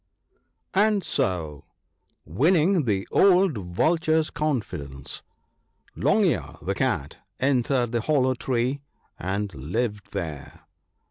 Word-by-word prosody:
35 195 Hz, -, +5 dB
1 215 Hz, -, +2 dB
And 200 Hz, -3 st, -1 dB
so, 80 Hz, -, -2 dB, 0.6 s
winning 160 Hz, -, +3 dB
the 100 Hz, -4 st, 0 dB
old 190 Hz, -4 st, +5 dB
Vulture's 155 Hz, -, +1 dB
confidence, 75 Hz, -, -3 dB, 0.7 s
Long -, -, +3 dB
ear, -, -, 0 dB
the -, -, -2 dB
Cat, 70 Hz, -, -1 dB, 0.2 s
entered 130 Hz, -2 st, +1 dB
the 120 Hz, -1 st, 0 dB
hollow 130 Hz, -1 st, +2 dB
tree 130 Hz, +2 st, -1 dB, 0.4 s
and 100 Hz, +3 st, -2 dB
lived 100 Hz, -, -3 dB
there. 75 Hz, -5 st, -6 dB
120 Hz, 110 wpm, -25 LUFS, 90-155 Hz, 0.7 s, 35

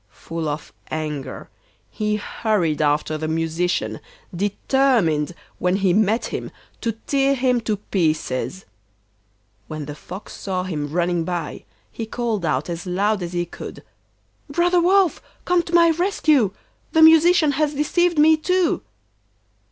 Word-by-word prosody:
Full 165 Hz, +5 st, -5 dB
of 150 Hz, +1 st, -6 dB, 0.2 s
anger, 150 Hz, -3 st, -4 dB, 0.4 s
he 210 Hz, 0 st, -1 dB
hurried 205 Hz, -7 st, -1 dB
after 150 Hz, +1 st, +1 dB
the 155 Hz, -, -2 dB
Musician, 165 Hz, -7 st, -1 dB, 0.4 s
determined 200 Hz, -, +1 dB, 0.2 s
when 180 Hz, +1 st, +1 dB
he 195 Hz, -2 st, +2 dB
met 215 Hz, +3 st, +2 dB
him -, -, -4 dB, 0.3 s
to 230 Hz, -, -1 dB
tear 275 Hz, 0 st, +2 dB
him 250 Hz, -2 st, +1 dB
to 215 Hz, -2 st, -1 dB
pieces. 170 Hz, -2 st, -1 dB, 1.0 s
When 155 Hz, -1 st, -5 dB
the 150 Hz, -, -6 dB
Fox 185 Hz, +6 st, -10 dB
saw 185 Hz, -2 st, -3 dB
him 150 Hz, -6 st, -4 dB
running 175 Hz, 0 st, 0 dB
by, 170 Hz, -2 st, -4 dB, 0.3 s
he 225 Hz, -, -5 dB
called 225 Hz, -4 st, -2 dB
out 140 Hz, -3 st, 0 dB
as 170 Hz, +2 st, -5 dB
loud 200 Hz, +3 st, +1 dB
as 175 Hz, 0 st, -5 dB
he 175 Hz, 0 st, 0 dB
could: 170 Hz, -, -9 dB, 0.7 s
'Brother 345 Hz, +4 st, +2 dB
Wolf, 370 Hz, 0 st, +3 dB, 0.2 s
come 355 Hz, -1 st, +3 dB
to 340 Hz, 0 st, -9 dB
my 335 Hz, -1 st, +6 dB
rescue, 310 Hz, -, +2 dB, 0.4 s
the 320 Hz, -1 st, +6 dB
Musician 320 Hz, 0 st, +6 dB
has 295 Hz, +1 st, 0 dB
deceived 345 Hz, +4 st, +1 dB
me 310 Hz, +1 st, +6 dB
too. 360 Hz, +2 st, +1 dB
205 Hz, 135 wpm, -22 LUFS, -, 1.0 s, my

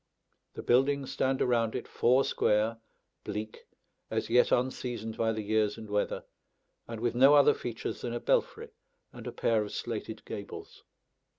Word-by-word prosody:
The -, -, -6 dB
buildings 135 Hz, +2 st, +2 dB
stand 130 Hz, 0 st, +1 dB
around 115 Hz, -3 st, +1 dB
it 125 Hz, -, -4 dB
four 130 Hz, +3 st, +3 dB
square, 110 Hz, 0 st, +1 dB, 0.4 s
bleak, 110 Hz, +1 st, -6 dB, 0.4 s
as -, -, -2 dB
yet 125 Hz, +1 st, +4 dB
unseasoned 120 Hz, -3 st, -1 dB
by 115 Hz, 0 st, +1 dB
the 110 Hz, -1 st, -3 dB
years 105 Hz, 0 st, +1 dB
and 110 Hz, -1 st, -9 dB
weather, 105 Hz, 0 st, -1 dB, 0.6 s
and 115 Hz, -1 st, -6 dB
with 120 Hz, +1 st, 0 dB
no 135 Hz, +4 st, +6 dB
other 145 Hz, -1 st, +6 dB
features 120 Hz, -2 st, -5 dB
than 120 Hz, -, -3 dB
a 120 Hz, -, -2 dB
belfry -, -, 0 dB, 0.4 s
and -, -, -9 dB
a -, -, -3 dB
pair 115 Hz, -2 st, +1 dB
of 105 Hz, -, -5 dB
slated -, -, -5 dB
gables. -, -, -8 dB
115 Hz, 160 wpm, -30 LUFS, 110-125 Hz, 0.6 s, no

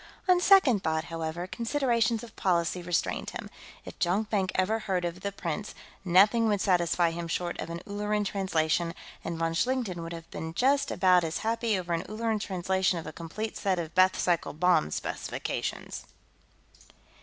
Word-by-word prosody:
On 365 Hz, -1 st, +5 dB
second 355 Hz, -, +5 dB
thought, 160 Hz, 0 st, 0 dB
however, 165 Hz, +1 st, -3 dB
considerations 235 Hz, 0 st, 0 dB
of 230 Hz, -, -11 dB
policy 175 Hz, -1 st, +1 dB
restrained 175 Hz, -1 st, -1 dB
him. -, -, -7 dB, 0.3 s
If -, -, -10 dB
Jonkvank 195 Hz, +2 st, +1 dB
ever 205 Hz, +4 st, +1 dB
heard 185 Hz, -4 st, -1 dB
of 175 Hz, +1 st, -4 dB
The 200 Hz, -, -2 dB
Prince, 195 Hz, +1 st, -4 dB, 0.3 s
nothing 200 Hz, +6 st, +5 dB
would 205 Hz, -2 st, +2 dB
satisfy 175 Hz, -3 st, +2 dB
him 170 Hz, 0 st, -5 dB
short 175 Hz, +1 st, -2 dB
of -, -, -4 dB
an 170 Hz, 0 st, -5 dB
Ulleran 210 Hz, +1 st, -1 dB
translation, 170 Hz, -4 st, 0 dB, 0.3 s
and 170 Hz, 0 st, -4 dB
von 165 Hz, 0 st, 0 dB
Schlichten 225 Hz, -3 st, -1 dB
would 165 Hz, +1 st, -6 dB
have 165 Hz, -1 st, -9 dB
been 160 Hz, 0 st, -6 dB
just 275 Hz, +5 st, +2 dB
about 180 Hz, -2 st, +4 dB
as 165 Hz, 0 st, -2 dB
happy 225 Hz, -2 st, +1 dB
over 175 Hz, -2 st, -3 dB
an 165 Hz, -, 0 dB
Ulleran 220 Hz, 0 st, -1 dB
translation 190 Hz, -1 st, 0 dB
of 165 Hz, -, -6 dB
a -, -, -7 dB
complete 195 Hz, +7 st, -5 dB
set 195 Hz, -3 st, 0 dB
of 165 Hz, -2 st, -4 dB
Bethe 185 Hz, 0 st, +4 dB
cycle 175 Hz, -2 st, 0 dB
bomb 170 Hz, -, +3 dB
specifications. -, -, -4 dB
185 Hz, 165 wpm, -28 LUFS, 170-215 Hz, 0.3 s, On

